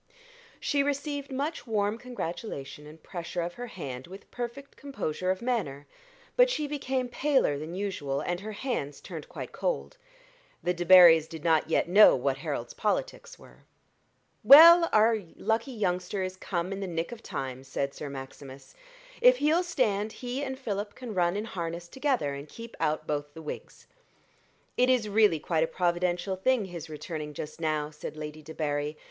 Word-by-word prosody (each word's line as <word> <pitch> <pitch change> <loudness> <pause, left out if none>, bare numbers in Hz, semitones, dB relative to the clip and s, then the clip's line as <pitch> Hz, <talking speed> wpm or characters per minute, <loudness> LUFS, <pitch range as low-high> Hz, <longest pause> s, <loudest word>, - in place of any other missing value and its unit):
She 285 -2 +1
received 285 0 -2
much 275 0 -3
warm 210 0 0
congratulation 165 - -6
and 155 +2 -14
pressure 175 0 -4
of 175 +1 -4
her 245 +4 -7
hand 135 - -7
with 195 +3 -12
perfect 245 +3 -6
composure 185 - -4
of 185 +4 -1
manner; 170 - -2 0.5
but - - +6
she 305 -11 -1
became 265 -3 -2
paler 260 - +1
than 160 +3 -6
usual, 185 -9 -2
and 175 0 -2
her 215 +2 -7
hands 205 - -3
turned 165 -5 -9
quite - - -7
cold. - - -3 0.7
The 180 - +1
Debarrys 175 -2 +7
did 160 -2 -9
not 160 -2 +2
yet 165 - +2
know 200 +5 +7
what - - 0
Harold's - - -4
politics - - -2
were. - - -17 0.8
"Well, 335 +4 +10
our 220 +1 +4 0.2
lucky 225 +4 -1
youngster 190 -3 -1
is 185 0 -4
come 185 0 -3
in 195 - -5
the 195 - -3
nick 165 +2 -3
of 235 -2 -8
time," 130 - -5
said 140 +1 -3
Sir 145 - -6
Maximus: 135 0 -10 0.5
"if - - +7
he'll 315 +1 +3
stand, 215 - 0
he 250 +2 -4
and 265 -1 -4
Philip 205 -5 -4
can 245 -4 -7
run 175 0 +1
in 210 - -3
harness 170 -4 -5
together 260 - -1
and 140 +2 -8
keep 230 0 -10
out 155 -1 0
both 145 -1 -3
the 160 - -8
Whigs." 150 - -8 0.9
"It 250 +1 +4
is 250 -4 +3
really 210 -5 +4
quite 160 +1 0
a - - 0
providential 175 +2 0
thing 230 +3 +1
his 170 -3 -8
returning 150 -1 -6
just 155 +3 -7
now," 155 -1 -1
said 150 0 -8
Lady 155 0 -7
Debarry. 150 -1 -3
185 Hz, 170 wpm, -28 LUFS, 155-245 Hz, 0.9 s, Well